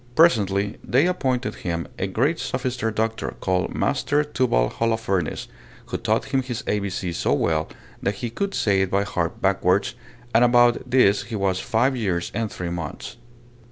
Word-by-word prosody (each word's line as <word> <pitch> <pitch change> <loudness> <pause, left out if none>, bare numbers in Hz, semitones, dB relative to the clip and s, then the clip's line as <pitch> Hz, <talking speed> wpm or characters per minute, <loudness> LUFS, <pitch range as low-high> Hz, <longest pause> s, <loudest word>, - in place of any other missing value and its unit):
Presently 100 - +3
they 135 +6 +3
appointed 130 -8 0
him 85 -2 -4
a 95 - 0
great 135 - 0
sophister 125 -2 -2
doctor, 110 +1 -2
called 95 -1 -1
Master 145 +1 +1
Tubal 125 - +1
Holofernes, 110 -7 -1 0.4
who - - -3
taught - - 0
him 135 - +3
his 125 -3 -5
ABC 100 -3 -2
so - - 0
well, 80 -1 0 0.3
that 100 +1 -1
he 115 +3 -4
could 200 +11 -2
say 100 -2 +2
it 95 - 0
by 100 +1 +2
heart 90 -5 -3
backwards; 95 +4 +2 0.4
and 115 - +5
about 120 0 +4
this 100 -6 +4
he 115 0 -5
was 95 -2 0
five 125 +5 +1
years 95 -8 -1
and 110 0 -2
three 90 -1 -4
months. 85 -3 -6
105 Hz, 160 wpm, -23 LUFS, 95-125 Hz, 0.4 s, and